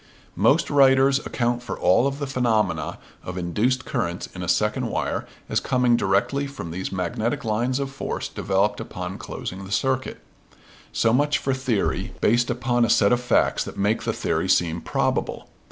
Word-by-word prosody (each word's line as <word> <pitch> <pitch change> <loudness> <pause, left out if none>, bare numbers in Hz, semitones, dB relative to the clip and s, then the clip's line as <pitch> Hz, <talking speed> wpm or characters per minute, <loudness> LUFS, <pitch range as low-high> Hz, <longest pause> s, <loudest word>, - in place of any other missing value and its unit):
Most 135 - +3
writers 135 -1 +5
account 120 -1 -1
for 125 - -5
all 95 +9 +4
of 140 0 -3
the 145 - -3
phenomena 120 -7 0 0.3
of 90 0 -6
induced 110 +9 0
currents - - -2
in - - -7
a - - -4
second - - +1
wire - - -2 0.2
as - - +1
coming 125 -1 +2
directly 115 +8 +1
from 135 -12 -7
these 90 +3 -4
magnetic 110 - -2
lines 120 +4 0
of 140 -1 -3
force 135 - -4
developed 100 +2 0
upon - - -6
closing 95 +2 -6
the 95 - -9
circuit. 130 +3 -1 0.7
So 115 0 +2
much 145 +3 +3
for 135 - -1
theory 130 -6 -1
based 120 +2 +2
upon 120 0 +1
a 115 - +2
set 100 -1 +4
of 120 - +2
facts 125 - +2
that - - -8
make 105 +3 +1
the - - -1
theory - - -1
seem 85 -1 +2
probable. - - -1
120 Hz, 170 wpm, -24 LUFS, 100-135 Hz, 0.7 s, writers